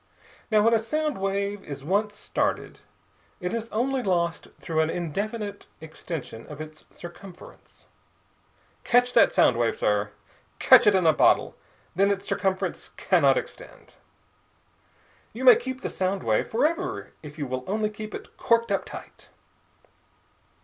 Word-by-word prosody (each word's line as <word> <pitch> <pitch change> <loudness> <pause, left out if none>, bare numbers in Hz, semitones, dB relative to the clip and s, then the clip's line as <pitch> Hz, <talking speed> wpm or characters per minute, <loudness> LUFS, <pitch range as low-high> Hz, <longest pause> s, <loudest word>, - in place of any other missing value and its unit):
Now, 215 -2 +4
when 230 +1 +4
a 225 - +4
sound 300 +4 -2
wave 200 +1 -2
is 140 -2 -8
once 205 +6 0
started, - - -2 0.6
it 180 -2 -3
is 230 0 -4
only 260 +4 -1
lost 170 -5 -1
through 160 -2 -2
an 160 0 +2
indefinite 200 +5 -4
extension 160 -6 -8
of 150 -1 -10
its 155 0 -10
circumference. 175 +1 -13 1.0
Catch 245 +1 +3
that 235 - +5
sound 120 - +4
wave, 120 -1 0
sir! 105 0 0 0.5
Catch - - +6
it 205 - +6
in 185 -2 +2
a 160 - +6
bottle, - - +3 0.4
then 195 +3 +3
its 200 0 -2
circumference 190 -1 -2
cannot - - +3
extend. - - -9 1.4
You 255 +3 -5
may 250 - +10
keep 260 +1 -5
the - - -3
sound 190 +1 -2
wave 110 -1 +1
forever 335 - -1
if 150 0 -11
you 145 - -3
will 130 0 -4
only 215 +2 -1
keep 215 0 -7
it - - -10
corked 230 -2 +2
up - - 0
tight. - - -11
200 Hz, 145 wpm, -25 LUFS, 160-230 Hz, 1.4 s, may